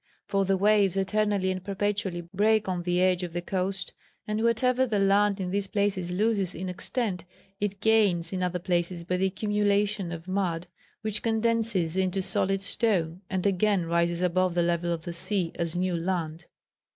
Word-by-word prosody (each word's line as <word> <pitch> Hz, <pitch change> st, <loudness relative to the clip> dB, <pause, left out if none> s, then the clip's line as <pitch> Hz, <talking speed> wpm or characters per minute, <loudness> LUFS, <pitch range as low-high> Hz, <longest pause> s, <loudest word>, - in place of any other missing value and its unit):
For 195 Hz, -1 st, 0 dB
the 190 Hz, 0 st, +2 dB
waves 200 Hz, -1 st, +3 dB
eternally 200 Hz, -1 st, +1 dB
and 185 Hz, -1 st, -4 dB
perpetually 200 Hz, -2 st, -2 dB
break 215 Hz, +2 st, +3 dB
on 180 Hz, -2 st, -1 dB
the 175 Hz, 0 st, 0 dB
edge 185 Hz, -1 st, +2 dB
of 175 Hz, -2 st, -5 dB
the 175 Hz, -, -2 dB
coast, 190 Hz, +1 st, -2 dB, 0.3 s
and 215 Hz, +1 st, -1 dB
whatever 250 Hz, +3 st, +2 dB
the 215 Hz, -3 st, 0 dB
land 200 Hz, +1 st, +3 dB
in 180 Hz, -1 st, -3 dB
these 200 Hz, 0 st, -1 dB
places 195 Hz, -3 st, -1 dB
loses 200 Hz, -1 st, 0 dB
in 185 Hz, +2 st, -4 dB
extent, 185 Hz, 0 st, -2 dB, 0.4 s
it 200 Hz, -1 st, -3 dB
gains 200 Hz, -6 st, +3 dB
in 185 Hz, -, -2 dB
other 180 Hz, 0 st, 0 dB
places 175 Hz, -1 st, -1 dB
by 180 Hz, +1 st, -1 dB
the 190 Hz, +1 st, +2 dB
accumulation 205 Hz, -1 st, 0 dB
of 170 Hz, 0 st, -7 dB
mud, 180 Hz, -3 st, -1 dB, 0.4 s
which 215 Hz, -1 st, -1 dB
condenses 225 Hz, -6 st, +1 dB
into 190 Hz, 0 st, 0 dB
solid 195 Hz, 0 st, +1 dB
stone 185 Hz, -5 st, 0 dB
and 190 Hz, 0 st, -2 dB
again 200 Hz, -1 st, +2 dB
rises 170 Hz, +1 st, 0 dB
above 180 Hz, 0 st, +1 dB
the 175 Hz, -, +3 dB
level 170 Hz, 0 st, 0 dB
of 165 Hz, -1 st, -3 dB
the 170 Hz, -, -5 dB
sea 175 Hz, 0 st, -1 dB
as 170 Hz, -1 st, -3 dB
new 180 Hz, 0 st, 0 dB
land. 170 Hz, -2 st, -3 dB
190 Hz, 175 wpm, -27 LUFS, 175-205 Hz, 0.4 s, waves